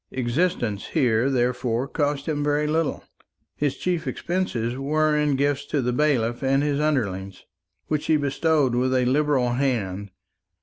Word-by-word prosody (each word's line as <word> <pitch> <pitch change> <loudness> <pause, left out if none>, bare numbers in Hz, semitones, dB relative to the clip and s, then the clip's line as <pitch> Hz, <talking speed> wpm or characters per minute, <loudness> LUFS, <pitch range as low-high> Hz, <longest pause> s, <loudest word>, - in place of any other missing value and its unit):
Existence 120 - -1
here 125 -4 +2
therefore 125 -1 0
cost 145 -1 -1
him 145 -2 -1
very 150 +1 +1
little; 160 +1 -1 0.5
his 145 -2 -1
chief 175 -3 -2
expenses 130 -10 -2
were 150 +3 +1
in 150 -2 +2
gifts 140 +1 0
to 145 - 0
the 125 -1 0
bailiff 120 -5 +1
and 135 +1 +2
his 145 -1 0
underlings, 100 -11 -2 0.4
which 150 0 -2
he 155 - +4
bestowed 145 -1 +1
with 130 +2 +1
a 125 -1 +2
liberal 135 -2 +2
hand. 105 -7 -1
135 Hz, 145 wpm, -24 LUFS, 120-150 Hz, 0.5 s, he